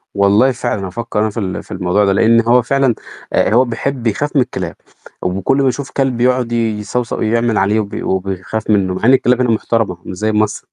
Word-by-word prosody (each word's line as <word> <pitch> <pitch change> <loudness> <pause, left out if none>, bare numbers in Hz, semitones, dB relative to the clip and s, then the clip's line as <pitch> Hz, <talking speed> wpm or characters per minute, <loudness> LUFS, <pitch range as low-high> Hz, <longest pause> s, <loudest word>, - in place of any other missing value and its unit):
والله 100 +6 +4
فعلًا 100 -5 -3
هافكر 110 +3 -4
أنا 110 - +1
في 105 - -5
ال 95 -3 -4
في - - -18
الموضوع 95 +2 +1
ده 100 - +2
لأن 115 +3 +4
هو 120 +2 +4
فعلًا 135 0 +1 0.4
آآ، - - +2
هو 125 +3 +5
بيحب 125 +2 -3
بيخاف 120 +7 -1
من 140 - +5
الكلاب، 125 - -4 0.5
وكل 95 +8 0
ما 135 -1 +2
يشوف 130 +2 -3
كلب 130 -3 -1
يقعد 125 -1 +1
يصَوصَو 115 +1 -2
يعمل 115 0 +1
عليه 105 +3 +2
وبي 105 -2 -4
وبيخاف 95 +3 -3
منه 100 -3 +2
مع 95 - -6
إن 130 - +6
الكلاب 125 -1 +3
هنا 125 - +1
محترمة 110 -4 0
مش 90 - -7
زي 110 +2 0
مصر 105 -1 -1
110 Hz, 205 wpm, -16 LUFS, 100-125 Hz, 0.5 s, إن